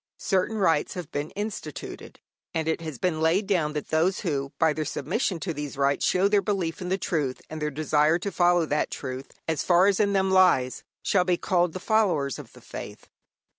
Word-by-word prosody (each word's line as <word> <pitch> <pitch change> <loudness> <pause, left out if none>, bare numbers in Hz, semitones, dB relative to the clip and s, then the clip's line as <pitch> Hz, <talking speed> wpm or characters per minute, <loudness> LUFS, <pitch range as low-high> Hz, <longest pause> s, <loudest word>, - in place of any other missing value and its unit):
Certain 195 +3 0
rites 165 -7 +2
have 180 -5 -6
been 145 +2 -3
instituted, 205 -8 -6 0.4
and 160 -1 -1
it 160 +1 0
has 155 -5 -6
been 160 +2 -1
laid 170 +6 +3
down 170 -7 +1
that 150 -2 -4
those 170 +4 +1
who 140 -7 -2
by 160 -2 +3
their 155 - -2
submission 175 - -2
to 170 0 -3
these 145 -2 -6
rites 140 0 +2
show 185 +2 +3
their 205 0 +3
belief 190 -6 -2
in 180 - -4
the 190 - +1
truth 150 -9 -1
and 155 0 -6
their 150 - 0
desire 150 +2 +2
to 200 +3 -4
follow 175 -2 +3
that 150 0 0
truth 130 0 -6 0.2
as 160 -2 0
far 180 +1 +4
as 200 -1 +3
in 200 -1 +2
them 190 -1 +2
lies, 180 -9 +3 0.2
shall 185 -3 +3
be 180 -1 +1
called 175 -2 +1
the 185 - -5
followers 185 - +1
of - - -11
the - - -15
faith. - - -9
165 Hz, 210 wpm, -26 LUFS, 150-190 Hz, 0.4 s, far